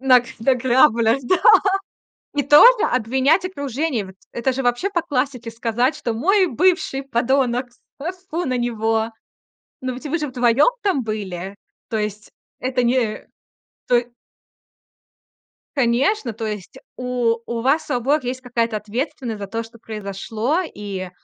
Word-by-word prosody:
Нак 255 -2 +5 0.2
наклябалясь, 245 -1 +3
да. 370 - +3 1.0
И 285 - +1
тоже 445 - +7
обвинять 265 - +2
окружение. 280 - -2
Вот 190 - -12 0.2
это 250 +2 0
же, 265 +1 -3
вообще, 245 +11 0
по 345 -3 0
классике 255 -6 -2
сказать, 235 +4 0
что: 235 - -3
Мой 375 - +3
бывший- 345 -2 +1
подонок, 255 0 +1 0.3
тьфу-тьфу 355 +2 -4
на 255 -1 0
него!" 225 -1 0 0.7
Но 255 -1 -3
ведь 260 +5 -10
вы 335 +4 0
же 300 - -2
вдвоём 250 - +3
там 370 - +1
были. 195 -3 -5 0.3
То 220 - -1
есть, 210 0 -4 0.3
это 255 -1 0
не, 235 -3 0 0.6
то 245 - +5
е 240 0 -1 1.7
Конечно, 255 - +1
то 225 +1 -5
есть 210 -4 -6 0.2
у 245 -2 0
у 235 -1 -3
вас, 280 +5 +1
у - - +1
обоих 260 +3 +1
есть 255 +1 -3
какая-то 235 -3 -1
ответственность 235 +2 -4
за 200 - -4
то, 230 +3 -3
что 230 +1 -14
произошло. 220 - -3
И, 195 -3 -5
245 Hz, 140 wpm, -21 LUFS, 225-275 Hz, 1.7 s, тоже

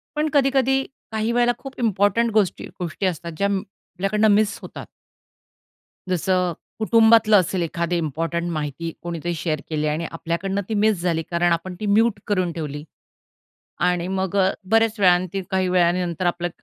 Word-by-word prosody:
पण 305 +1 0
कधी-कधी, 270 -1 +3 0.3
काही 220 +1 -1
वेळेला 240 0 +3
खूप 270 -1 -9
इम्पोर्टंट 225 +1 +2
गोष्टी 210 -4 +1
गोष्टी 180 +2 -3
असतात 170 -1 -2
ज्या 200 - +1
अं, 200 -1 0
आपल्याकडनं 195 +2 -2
मिस 215 0 +1
होतात. - - -9 1.3
जसं 180 0 +1 0.3
कुटुंबातलं 220 -1 +5
असेल 180 0 -2
एखादी 170 +1 -1
इम्पॉर्टंट 165 +2 -2
माहिती 155 +2 -4
कोणीतरी 170 0 -3
शेअर 155 -2 -2
केली 155 -1 -1
आणि 160 +2 -2
आपल्याकडनं 170 +4 -2
ती 220 - -2
मिस 210 -3 +2
झाली 165 -2 0
कारण 170 0 +2
आपण 180 +2 -2
ती 210 - -3
म्यूट 215 +1 +3
करून 185 -5 0
ठेवली 150 -2 -5 1.1
आणि 175 0 -1
मग 190 0 -2 0.4
बऱ्याच 225 -1 +3
वेळा 180 -2 +6 0.2
ती 195 - -1
काही 190 -1 +1
वेळानंतर 175 -1 +1
आपलं 175 0 0
185 Hz, 150 wpm, -22 LUFS, 170-215 Hz, 1.3 s, वेळा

